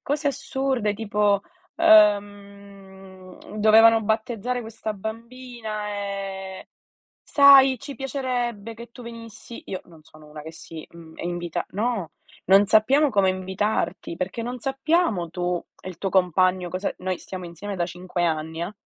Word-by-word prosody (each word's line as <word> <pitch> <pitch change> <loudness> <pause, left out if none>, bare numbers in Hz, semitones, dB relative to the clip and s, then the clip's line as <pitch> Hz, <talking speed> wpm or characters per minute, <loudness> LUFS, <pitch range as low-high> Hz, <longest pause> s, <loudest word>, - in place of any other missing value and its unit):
cose 290 +1 -1
assurde 265 -6 -1
tipo, 205 -2 +1 0.4
ehm, 200 - +1
dovevano 225 +1 +6
battezzare 230 +3 -1
questa 220 -1 -5
bambina 220 0 -6
e: 195 -2 -5 0.6
"Sai, 270 -3 +7
ci 275 -1 -8
piacerebbe 245 -4 -3
che 235 +1 -12
tu 245 - -12
venissi!". 230 0 -10
Io 185 - -5
non 160 -3 -18
sono 155 0 -17
una 150 0 -10
che 160 +1 -9
si, 165 -1 -10
mhmm, 165 -1 -13
invita. 175 -1 -3
No: 210 -3 -2 0.3
"Non 195 +2 +6
sappiamo 270 +9 +4
come 200 -4 +3
invitarti 185 -1 -2
perché 185 +5 -3
non 245 +1 -5
sappiamo 270 - 0
tu 175 +1 -2 0.2
e - - -10
il 180 - -8
tuo 195 +2 -2
compagno 185 0 +2
cosa" 185 +3 -3
noi 185 0 -2
stiamo 185 -2 -7
insieme 190 +4 -7
da 175 - 0
5 180 0 -3
anni 160 0 -2
eh. 190 +5 -6
205 Hz, 140 wpm, -24 LUFS, 185-235 Hz, 0.6 s, Sai